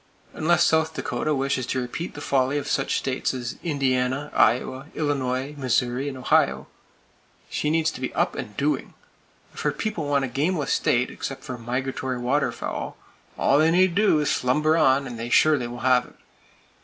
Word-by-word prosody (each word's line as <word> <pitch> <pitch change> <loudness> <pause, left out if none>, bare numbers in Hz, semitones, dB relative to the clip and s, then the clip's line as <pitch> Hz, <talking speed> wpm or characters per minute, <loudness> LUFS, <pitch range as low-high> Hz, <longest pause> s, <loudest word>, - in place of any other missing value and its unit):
Unless 170 +2 +3
South 160 0 +2
Dakota 155 -1 -1
wishes 135 -2 -1
to 130 - -1
repeat 125 +8 -5
the 145 - -7
folly 135 0 +1
of 145 0 -3
such 135 - 0
states 130 0 -1
as 120 -1 -5
Indiana, 135 -2 0
Iowa, 130 +3 +2
Illinois, 135 -2 -1
Missouri 125 +1 0
and 135 - -7
Ohio, 130 - +2 0.9
she 150 - -1
needs 160 0 +2
to - - -9
be 130 - -2
up - - +1
and 105 - -7
doing. 145 +2 -1 0.6
If - - -10
her - - +1
people 210 -9 -3
want 140 -1 +2
a - - -3
gameless 145 +5 0
state, 125 +1 +1
except 135 - -6
for 130 - -5
migratory 130 +2 -3
waterfowl, 125 +4 -2 0.4
all 140 - +3
they 160 +1 +4
need 180 +1 +4
do 205 -3 +4
is 150 - 0
to - - +2
slumber 150 +5 +2
on, 135 -3 +3
and 120 -3 -7
they 115 +1 -4
surely 145 -2 +4
will 120 0 -8
have 125 -1 +3
it. - - -19
135 Hz, 180 wpm, -24 LUFS, 125-150 Hz, 0.9 s, they